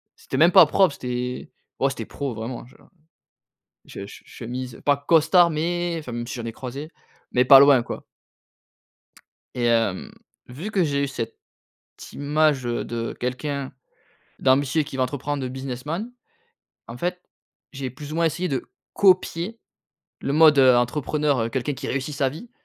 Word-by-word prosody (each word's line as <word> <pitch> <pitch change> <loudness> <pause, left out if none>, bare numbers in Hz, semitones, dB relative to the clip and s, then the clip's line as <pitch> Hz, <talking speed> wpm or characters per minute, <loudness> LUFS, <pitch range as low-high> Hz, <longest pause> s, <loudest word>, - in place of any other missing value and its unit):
c'était - - -6
même 170 +3 +6
pas 185 -4 +9
propre, 175 0 +3
c'était 125 0 -5 0.3
ouais, 135 - +2
c'était 135 - -6
pro 140 -3 -5
vraiment, 115 +3 -6
genre, 125 - -20
heu, - - -22 1.0
je 100 - -8
che - - -13
chemise, 125 +1 -7
pas 145 0 +4
costard 165 +4 +4
mais, 170 +2 -1
enfin 130 -6 -8
même 120 0 -4
si - - -6
j'en 120 - -6
ai 115 - -4
croisé, 135 +6 -7 0.4
mais 125 - +3
pas 135 +1 +10
loin, 140 -3 +6
quoi - - -7 1.5
et 120 - -1
hem, 115 -5 +1 0.4
vu 155 +13 -7
que 195 -4 +2
j'ai 140 -3 0
eu - - 0
cette 115 -4 -5 0.8
image 145 -1 +1
de, 120 -1 -3
quelqu'un 135 +2 -3 0.7
d'ambitieux, 140 +4 +2
qui 145 -1 -9
veut - - 0
entreprendre, 145 +1 -3
de - - -2
businessman. 135 - -5 0.8
En 115 - -8
fait, 180 +6 -3 0.5
j'ai 135 -2 -5
plus 145 +4 -9
ou - - -4
moins 170 - +2
essayé 175 +3 -1
de 135 -3 -2 0.3
copier 185 +2 +2 0.6
le 140 - -2
mode, 155 -1 +6
heu, 130 -2 +7
entrepreneur, 145 +3 0
heu, 115 - 0
quelqu'un 130 +4 -2
qui - - -6
réussit 135 +2 -3
sa 135 -1 +1
vie. 165 - -10
140 Hz, 165 wpm, -23 LUFS, 125-155 Hz, 1.5 s, pas